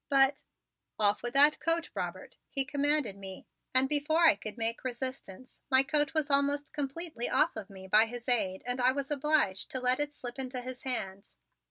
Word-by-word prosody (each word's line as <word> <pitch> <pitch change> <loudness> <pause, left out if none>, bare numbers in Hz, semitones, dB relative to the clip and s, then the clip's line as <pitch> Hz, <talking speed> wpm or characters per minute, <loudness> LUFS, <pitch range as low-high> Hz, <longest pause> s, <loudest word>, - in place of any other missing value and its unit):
"But 275 0 +3 0.3
" - - -56
"Off 205 -1 +3
with 240 +2 -4
that 290 +2 +6
coat, 330 +2 -1
Robert!" - - -6
he 275 -1 -1
commanded 285 -6 +1
me, 190 -1 -8 0.3
and 260 +1 +4
before 300 +3 +1
I - - +8
could 210 +3 -8
make 230 0 -2
resistance, 255 -3 -6
my 260 0 +5
coat 295 +2 +1
was 305 -2 0
almost 285 +1 +1
completely 295 -2 -3
off - - +2
of 220 -2 -7
me 190 -1 -12
by 215 +3 +5
his 240 +1 -9
aid 190 -7 0
and 250 +1 -2
I 255 +1 +4
was 280 +1 -4
obliged 285 - +1
to 260 - -3
let 255 +1 +1
it 295 0 -1
slip 250 -3 -8
into 255 -1 -5
his 255 0 -7
hands. 200 -7 -5
260 Hz, 195 wpm, -30 LUFS, 235-290 Hz, 0.3 s, I